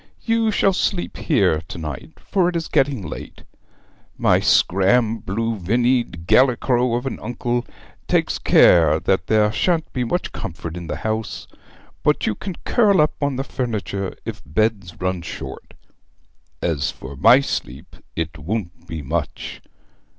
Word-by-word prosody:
You 225 -1 +2
shall 195 -2 +2
sleep 180 0 -1
here 80 -1 +2
to - - -7
night, 80 - -7
for 185 -3 +1
it 175 - -5
is 165 -1 -2
getting 135 -8 +1
late. 75 - -8 0.7
My - - +3
scram 110 +5 +3
blue 110 +3 -2
vinnied 120 -2 0
gallicrow 125 +1 +3
of 120 +2 -2
an 135 - -4
uncle 120 0 -2 0.4
takes - - +1
care 80 -3 +5
that 95 -4 0
there 105 +1 +3
shan't 165 +5 0
be 125 - 0
much 175 +9 -2
comfort 85 -5 -6
in 85 -1 -7
the - - -3
house, 110 0 -3 0.5
but - - +2
you - - +1
can 185 - -6
curl 205 -5 +4
up 150 0 +3
on 140 -2 0
the 135 - -2
furniture 105 -7 -3
if - - -6
beds 100 +1 -1
run 90 -1 -1
short. 65 -5 -8 0.9
As 80 -5 0
for 70 +1 -8
my 115 - +7
sleep, 70 - -5 0.2
it 80 0 -3
won't 85 0 -4
be 80 -3 -5
much. 80 +2 -4
110 Hz, 150 wpm, -21 LUFS, 85-130 Hz, 0.9 s, my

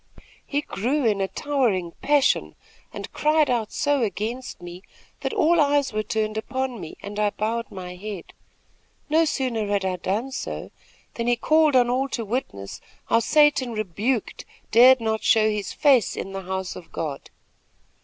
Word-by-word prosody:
He 290 0 -1
grew 265 +3 -1
in 205 -3 +2
a 195 - +1
towering 230 - 0
passion 290 -2 +2 0.4
and - - -8
cried 305 -2 +2
out 225 -3 -1
so 285 -2 +1
against 225 +4 -3
me, 175 +1 -9 0.4
that - - -3
all 345 -6 +3
eyes 285 -3 +2
were 215 - 0
turned 215 0 -2
upon 260 -1 -3
me, 160 - -8
and 205 +1 -6
I 210 -1 +3
bowed 225 +3 -3
my 180 -2 -7
head. 200 0 -8 0.8
No 320 +2 +4
sooner 250 -8 -1
had 200 -1 0
I 185 -1 -1
done 220 +9 -2
so, - - -5 0.4
than 235 0 -3
he 240 - +4
called 310 +3 +3
on 245 -1 +5
all 265 +2 0
to 230 - -4
witness 195 - -4 0.3
how 230 - +4
Satan 290 -1 +3
rebuked 215 +3 -2 0.3
dared 250 +2 +7
not 220 -1 -1
show 220 -1 +4
his 210 -2 -3
face 265 -8 +3
in 195 - -5
the 195 0 -5
house 190 0 -4
of 175 - -11
God. 150 -4 -5
230 Hz, 165 wpm, -24 LUFS, 200-270 Hz, 0.8 s, dared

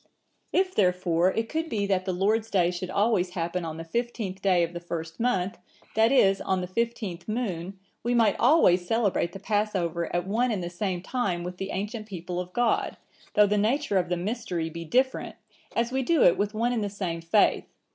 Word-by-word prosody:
"If 370 0 +1
therefore 180 -2 +2
it 225 0 -1
could 320 +5 -2
be 205 -2 -1
that 190 -2 0
the 190 - 0
Lord's 215 +5 +1
day 180 -5 +2
should 180 +1 -5
always 190 -3 +1
happen 170 +1 -2
on 160 -1 -5
the 165 - -5
fifteenth 210 0 -3
day 185 -3 +3
of 170 +1 -3
the 175 - -4
first 165 -1 -6
month, 195 -7 0 0.4
that 225 +2 +4
is, 195 -7 +4
on 190 -1 0
the - - -2
fifteenth 200 -3 -3
moon, 195 -5 -3 0.2
we 240 +2 0
might 225 -4 +4
always 180 - +4
celebrate 205 -6 +1
the 195 - -8
Passover 190 -5 -1
at 175 0 -1
one 230 +6 +1
and 205 -6 -1
the 175 - -5
same 180 -1 -3
time 190 -8 -1
with 180 +1 -6
the 195 +1 -4
ancient 210 +3 -4
people 180 -2 -5
of 180 0 -5
God, 240 +3 0 0.4
though 210 - +7
the 205 +1 +1
nature 225 -1 +1
of 175 -1 -2
the 180 - 0
mystery 180 -4 -3
be 170 +1 -6
different, 260 +9 0 0.4
as 235 +1 +1
we 265 +1 0
do 300 +3 +3
it 170 - +6
with 205 +1 -2
one 235 +3 +1
and 225 -3 0
the 205 - -2
same 185 -4 -4
faith. 170 +5 +2
195 Hz, 205 wpm, -27 LUFS, 175-225 Hz, 0.4 s, though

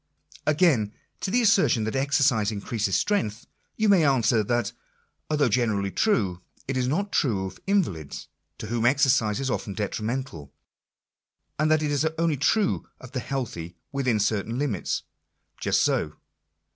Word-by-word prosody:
Again, 145 - +3 0.3
to - - -3
the 245 +5 +2
assertion 195 - +4
that 110 +3 -3
exercise 135 -5 +2
increases 105 -1 -2
strength 120 - 0
— - - -45
you 220 - +2
may 195 -5 +5
answer, 120 -5 +3
that 120 +3 -1 0.6
although 150 -3 +2
generally 105 -4 +1
true, 95 - +1 0.3
it 135 - -2
is 125 -1 0
not 195 +9 -1
true 105 -9 +1
of 95 0 -8
invalids, 125 - -1 0.3
to - - -7
whom 115 +2 0
exercise 125 -5 +3
is 135 -1 -1
often 100 -5 -3
detrimental; 105 - -4 1.1
and 155 0 +2
that 155 0 +3
it 150 - 0
is 145 0 +1
only 165 -3 +1
true 200 - +1
of 130 -2 -12
the 130 - -2
healthy 110 -11 -4 0.2
within 130 -5 0
certain 110 +2 0
limits. 130 -10 -1 0.6
Just - - +2
so. 75 - 0
125 Hz, 150 wpm, -26 LUFS, 105-145 Hz, 1.1 s, may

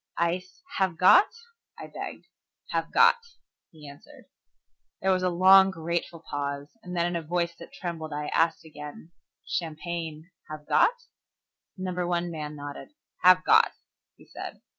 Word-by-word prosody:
"Ice, 180 +2 -2 0.2
have 185 -4 +1
got?" 185 - +7 0.5
I - - -8
begged. - - -8 0.5
"Have - - -2
got," - - +6 0.5
he 155 -3 -14
answered. 140 0 -14 0.7
There 190 - +1
was 185 -1 +2
a 185 - +1
long, 190 +2 +7
grateful 170 -1 -4
pause, 140 0 -4
and 180 0 -7
then 170 - +2
in 175 0 -2
a 170 - -1
voice 170 +1 -1
that 170 - -11
trembled, 165 -3 -6
I 150 0 -3 0.4
again 150 +1 -10
asked, - - -51
"Champagne, 165 0 -5 0.2
have 155 -1 -9
got?" 485 - +4 0.8
Number 180 -1 -3
One 175 0 -1
man 150 -2 -6
nodded. 145 - -9 0.3
"Have 185 0 +6
got," - - +5 0.4
he - - -18
said. - - -9
170 Hz, 145 wpm, -27 LUFS, 155-180 Hz, 0.8 s, got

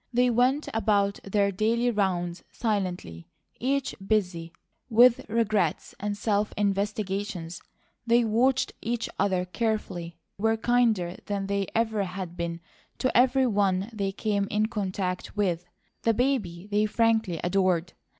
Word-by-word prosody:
They 250 0 +3
went 255 +5 +2
about 200 -2 +1
their 200 0 +1
daily 230 +5 +1
rounds 180 -4 -1
silently, 180 - -3 0.3
each 270 +2 0
busy 180 -5 0 0.4
with 240 +1 +6
regrets 215 -7 0
and 205 0 -3
self 210 0 0
investigations. 200 -3 -2 0.5
They 235 +1 +5
watched 245 +4 +2
each 235 +1 -2
other 190 -2 +1
carefully, 180 -5 -3 0.2
were 225 +2 +2
kinder 220 -7 +1
than 200 -1 -2
they 200 -1 -1
ever 220 -3 +1
had 180 -1 -6
been 170 -1 -4 0.4
to 255 - -1
everyone 225 -6 +3
they 200 -2 -1
came 200 0 -1
in 210 +1 +1
contact 190 -3 -3
with; 180 -4 0 0.4
the 225 -1 +2
baby 205 -9 -1
they 210 +1 +2
frankly 220 -5 +1
adored. 180 -2 +1
205 Hz, 125 wpm, -27 LUFS, 185-225 Hz, 0.5 s, with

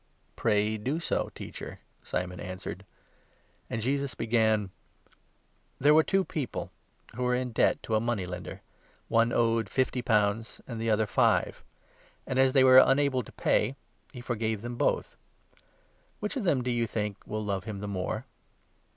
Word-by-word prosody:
" - - -40
Pray 105 -1 +1
do 135 +9 -1
so, 170 - -1
Teacher," - - -8 0.2
Simon 90 -1 -3
answered; 95 +1 -6 0.8
and 115 - -3
Jesus 140 +1 -1
began: 110 -3 +1 1.1
'There 145 +2 +5
were 160 - +7
two 195 +3 +2
people 145 -6 -4 0.4
who 125 - -5
were 125 0 +2
in 125 0 -2
debt - - +2
to 110 - -4
a 110 - +4
money 115 -4 -1
lender; 90 0 -7 0.5
41 115 0 +4
one - - -5
owed 115 -3 +1
fifty 130 +1 0
pounds, 110 -1 +1
and 115 -3 -6
the 115 - 0
other 110 0 +3
five. 105 - +1 0.6
As 130 0 +2
they 135 -2 +6
were 130 0 +8
42 - - +6
unable 135 -2 +2
to 110 - -12
pay, 135 - +1 0.4
he 125 -3 -9
forg 120 -2 -2
ave 110 0 +1
them 120 0 -5
both. 140 +4 0 1.0
Which 210 +6 -3
of 250 -7 -2
them, 140 -8 +2
do 125 - -1
you 120 -1 0
think, 105 -2 -3
will 110 0 -3
love 100 -1 -2
him 110 -3 -5
the 105 - -5
more 95 -2 -3
115 Hz, 170 wpm, -29 LUFS, 105-130 Hz, 1.1 s, were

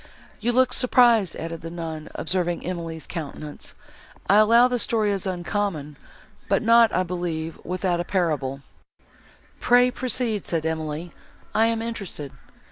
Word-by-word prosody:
You 235 +3 0
look 255 +1 +3
surprised," 240 -6 +4
added 165 0 -6
the 165 - -6
nun, 165 -2 -6
observing 175 0 -1
Emily's 165 -3 -4
countenance; 150 -2 -7 0.5
"I 200 - +5
allow 230 +3 +6
the 250 -1 -1
story 220 -2 +1
is 195 -1 -2
uncommon, 175 -4 -3 0.5
but - - +2
not, 230 0 +6
I 185 - +1
believe, 170 -3 -4
without 180 -1 -1
a - - 0
parallel." 150 -8 -1 1.0
"Pray 245 +1 +4
proceed," 245 -5 -1
said 165 -2 -1
Emily, 160 +1 -3 0.4
"I 225 +1 +4
am 225 0 -1
interested." 200 - -5
180 Hz, 135 wpm, -24 LUFS, 160-225 Hz, 1.0 s, allow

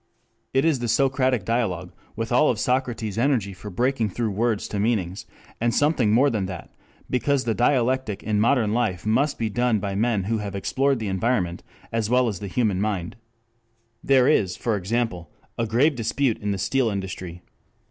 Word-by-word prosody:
It 135 +3 +2
is 155 -5 +2
the 120 - -2
Socratic 130 -2 +1
dialogue, 95 -7 -1 0.2
with 115 +1 -4
all 125 +5 +4
of 120 - 0
Socrates's 120 -4 -1
energy 120 -7 +1
for 105 +3 -9
breaking 120 +3 0
through 110 +2 -2
words 110 +1 0
to 100 - -3
meanings, 105 -1 -1 0.3
and 120 0 +1
something 145 -8 +2
more 135 +6 +4
than 100 -4 -1
that, 90 -4 -8 0.4
because 135 +1 +1
the 115 - 0
dialectic 125 -3 +1
in 105 -1 0
modern 110 -1 +2
life 105 -7 -1
must 135 +7 +1
be 115 - -1
done 120 +2 +1
by 100 -1 -3
men 105 0 +1
who 110 +3 -1
have 100 -2 -5
explored 135 +7 +1
the 110 -2 -4
environment 95 -3 0 0.3
as 115 -2 -1
well 125 0 +3
as 100 -6 -3
the 100 - -5
human 100 -3 0
mind. 100 -5 -2 0.9
There 130 -2 +4
is, 95 -11 +2
for 115 -3 -1
example, 100 -4 -2 0.3
a 115 - -1
grave 130 +8 +3
dispute 125 0 0
in 105 - -3
the 100 - 0
steel 130 +5 +1
industry. 95 -3 -5
115 Hz, 180 wpm, -24 LUFS, 100-125 Hz, 0.9 s, all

